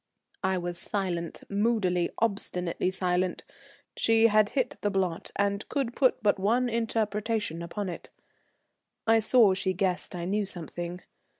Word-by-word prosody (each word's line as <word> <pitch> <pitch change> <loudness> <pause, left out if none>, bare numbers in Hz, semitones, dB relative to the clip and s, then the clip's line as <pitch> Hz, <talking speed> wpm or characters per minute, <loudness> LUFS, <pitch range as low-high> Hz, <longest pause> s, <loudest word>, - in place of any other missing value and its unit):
I 190 0 +1
was 175 -1 -4
silent, 175 -4 -3
moodily, 200 -4 +1
obstinately 180 -5 -1
silent. 185 -1 0 0.5
She 225 0 +4
had 215 -1 +4
hit 260 -3 -1
the 205 - +1
blot, 185 -4 -1
and 200 0 -1
could 265 -5 -1
put 260 -4 +2
but 205 -2 +3
one 240 +6 +2
interpretation 220 -5 -1
upon 190 +4 -4
it. 175 - -7 1.0
I 225 0 +5
saw 220 -2 +5
she 190 0 0
guessed 185 -1 -1
I 170 -1 -4
knew 205 +3 0
something. 175 0 -5
200 Hz, 135 wpm, -28 LUFS, 180-220 Hz, 1.0 s, I